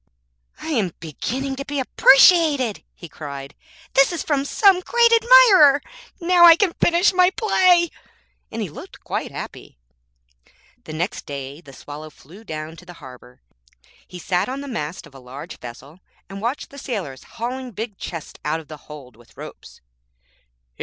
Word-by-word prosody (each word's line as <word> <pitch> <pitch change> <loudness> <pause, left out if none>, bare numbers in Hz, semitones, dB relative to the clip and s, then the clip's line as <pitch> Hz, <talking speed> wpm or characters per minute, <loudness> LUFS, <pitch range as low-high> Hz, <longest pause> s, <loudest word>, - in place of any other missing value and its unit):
'I - - -7
am 220 - 0
beginning 255 - -4
to 275 - -4
be 290 -1 -4
appreciated,' 275 - +4
he 170 - -11
cried; 140 -3 -9 0.4
'this 275 +4 +4
is 345 - -4
from 280 -2 -1
some 390 +2 +4
great 470 +5 +2
admirer. 455 - +6 0.4
Now 350 0 +3
I 335 -1 +9
can 370 -1 0
finish 345 +3 +3
my 365 0 +4
play,' 365 -5 +2 0.6
and - - -4
he - - -5
looked - - -13
quite - - -4
happy. - - -9 1.1
The 155 - -8
next 175 +6 -4
day 140 +1 -7
the 145 -5 -15
Swallow 145 +3 -10
flew 170 +8 -17
down 155 -3 -7
to 180 - -15
the 175 - -10
harbour. 125 - -15 0.6
He 180 - -10
sat 180 +4 -1
on 270 +2 -5
the 285 - -8
mast 170 - -5
of - - -18
a 135 - -13
large 130 +3 -10
vessel 135 +7 -12 0.3
and 195 0 -9
watched 240 +6 -4
the 280 - -11
sailors 190 - -6
hauling 255 +2 -4
big 220 -2 -7
chests 165 -3 -8
out 155 +2 -1
of 160 - -15
the 155 - -9
hold 140 -5 -12
with 120 0 -22
ropes. - - -12
225 Hz, 165 wpm, -21 LUFS, -, 1.1 s, I